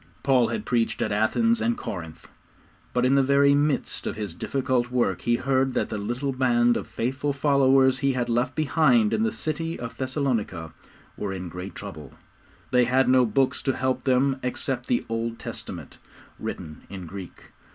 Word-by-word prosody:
Paul 130 Hz, -4 st, +4 dB
had 215 Hz, -, -3 dB
preached 120 Hz, -3 st, 0 dB
at 110 Hz, -, -2 dB
Athens 225 Hz, -, +2 dB
and 235 Hz, 0 st, +1 dB
Corinth, 80 Hz, -4 st, -7 dB, 0.6 s
but 125 Hz, 0 st, +1 dB
in 130 Hz, -, +3 dB
the 140 Hz, -, +5 dB
very 140 Hz, +1 st, +4 dB
midst 145 Hz, 0 st, 0 dB
of -, -, -3 dB
his 105 Hz, -5 st, -5 dB
difficult 130 Hz, +4 st, -1 dB
work 120 Hz, -8 st, 0 dB
he 120 Hz, -, +2 dB
heard 130 Hz, +1 st, +1 dB
that -, -, 0 dB
the 110 Hz, -, -3 dB
little 120 Hz, +7 st, -2 dB
band 120 Hz, -2 st, +3 dB
of -, -, -3 dB
faithful 135 Hz, +4 st, -2 dB
followers 135 Hz, -2 st, +4 dB
he 135 Hz, 0 st, +1 dB
had 125 Hz, -1 st, -1 dB
left 120 Hz, +2 st, 0 dB
behind 135 Hz, -8 st, +3 dB
in 110 Hz, -, +1 dB
the 110 Hz, 0 st, +1 dB
city 155 Hz, +8 st, -3 dB
of 115 Hz, -1 st, -6 dB
Thessalonica 125 Hz, -, -2 dB, 0.4 s
were 100 Hz, -2 st, -3 dB
in 90 Hz, -2 st, -5 dB
great 90 Hz, +3 st, -7 dB
trouble. 80 Hz, -9 st, -9 dB, 0.6 s
They 125 Hz, -1 st, +4 dB
had 130 Hz, +1 st, +3 dB
no 130 Hz, -1 st, +5 dB
books 130 Hz, +5 st, +1 dB
to 135 Hz, -, -1 dB
help 130 Hz, +1 st, -1 dB
them 130 Hz, +1 st, +2 dB
except 125 Hz, 0 st, -2 dB
the 120 Hz, -, 0 dB
Old 115 Hz, 0 st, -3 dB
Testament, -, -, -8 dB, 0.4 s
written 75 Hz, 0 st, -6 dB
in 95 Hz, -2 st, -7 dB
Greek. 95 Hz, +1 st, -10 dB
125 Hz, 175 wpm, -25 LUFS, 110-135 Hz, 0.6 s, the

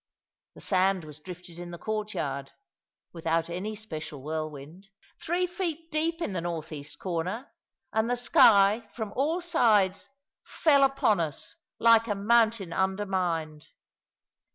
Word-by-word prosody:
The -, -, -12 dB
sand 190 Hz, -1 st, +2 dB
was 150 Hz, -1 st, -9 dB
drifted 175 Hz, 0 st, -10 dB
in 175 Hz, 0 st, -7 dB
the 170 Hz, -, -7 dB
courtyard 170 Hz, -11 st, -3 dB, 0.6 s
(without 165 Hz, 0 st, -1 dB
any 200 Hz, +5 st, -4 dB
special 155 Hz, -9 st, -7 dB
whirlwind) 155 Hz, +3 st, -6 dB, 0.3 s
three 350 Hz, +2 st, 0 dB
feet 335 Hz, -2 st, -4 dB
deep 330 Hz, +2 st, 0 dB
in 200 Hz, -, -3 dB
the 175 Hz, -, -2 dB
north 165 Hz, -2 st, -4 dB
east 145 Hz, -1 st, -8 dB
corner; 185 Hz, +8 st, -3 dB, 0.4 s
and 220 Hz, +1 st, +1 dB
the 245 Hz, -, +2 dB
sky, 225 Hz, -5 st, +5 dB
from 220 Hz, -3 st, -5 dB
all 315 Hz, +7 st, 0 dB
sides, 210 Hz, -, +2 dB, 0.3 s
fell 285 Hz, -4 st, +3 dB
upon 270 Hz, -7 st, +3 dB
us, 155 Hz, -4 st, -4 dB, 0.2 s
like 230 Hz, 0 st, +5 dB
a 205 Hz, -, 0 dB
mountain 220 Hz, -3 st, +2 dB
undermined. 185 Hz, -6 st, -1 dB
195 Hz, 130 wpm, -28 LUFS, 165-235 Hz, 0.6 s, sky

